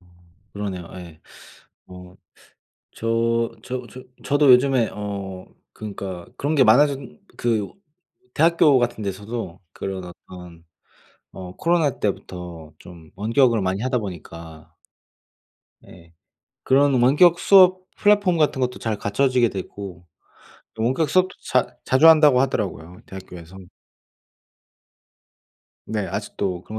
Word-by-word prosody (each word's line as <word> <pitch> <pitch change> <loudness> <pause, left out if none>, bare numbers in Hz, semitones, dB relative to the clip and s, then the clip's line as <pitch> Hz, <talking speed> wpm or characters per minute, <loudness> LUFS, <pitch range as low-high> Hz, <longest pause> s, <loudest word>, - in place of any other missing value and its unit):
어 90 - -26 0.5
그러네요. 95 -4 -6
예. 85 -3 -12 0.7
어 90 0 -13 0.8
저 115 +1 0
저 125 -1 -5
저 130 - -10 0.2
저도 145 -1 +4
요즘에 125 -2 +3
어 100 -2 -6 0.3
그니까 95 -4 -7
그런 150 +3 -1
게 135 - +5
많아졌 135 +5 +4 0.4
그 110 -4 -1 0.6
대학교 160 -3 +4
같은 120 -2 -2
데서도 100 -1 -6
그런 95 -1 -6
어떤 90 -1 -13 0.7
어 90 -1 -10
코로나 165 -5 0
때부터 90 -5 -5
좀 85 -3 -14
원격을 115 +3 +2
많이 95 +2 -2
하다 125 +1 0
보니까 85 -4 -10 1.1
예. 85 -1 -17 0.5
그런 140 +1 +3
원격수업 180 +6 +5
플랫폼 205 -4 +3
같은 150 -4 +1
것도 125 0 -2
잘 110 -2 -3
갖춰지게 125 +4 +1
되고 95 -2 -8 0.7
또 110 - -5
원격 130 +7 0
수업도 185 0 +2
자 - - -1
자주 130 +5 +5
한다고 150 -5 +6
하더라고요 90 -9 -3
대학교에서. 90 -2 -11 2.3
네. 105 -3 -3
아직도 90 -2 -4
그런 110 +3 -8
110 Hz, 235 characters per minute, -22 LUFS, 90-135 Hz, 2.3 s, 한다고